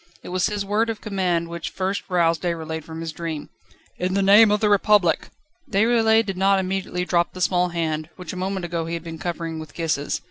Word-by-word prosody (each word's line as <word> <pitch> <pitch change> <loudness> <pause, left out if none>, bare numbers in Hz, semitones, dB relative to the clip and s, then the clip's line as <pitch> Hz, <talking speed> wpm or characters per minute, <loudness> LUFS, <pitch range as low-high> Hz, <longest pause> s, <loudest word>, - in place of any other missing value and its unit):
It - - -8
was 180 0 +1
his 205 -1 -3
word 215 +3 +1
of 220 -2 -3
command 180 -5 -1
which 170 0 -5
first 190 +1 -2
roused 170 -3 +2
Déroulède 160 -2 -3
from 160 +1 -8
his 165 -1 -4
dream: 160 -2 -5 0.5
"In 185 +1 -1
the 200 - +2
name 205 +3 +7
of 210 0 +2
the 215 - +2
Republic!" 205 -4 +3 0.4
Déroulède 225 +1 +3
did 195 -2 -4
not 195 +1 +4
immediately 185 -1 -2
drop 175 -1 +1
the 185 - -8
small 180 0 +2
hand, 160 -2 -2
which 180 - -7
a - - -6
moment 190 0 -2
ago 170 -1 -3
he 170 - -2
had 165 - -6
been 165 -1 -7
covering 165 -2 -4
with 155 -2 -10
kisses. 155 -4 -1
180 Hz, 215 wpm, -23 LUFS, 165-195 Hz, 0.5 s, name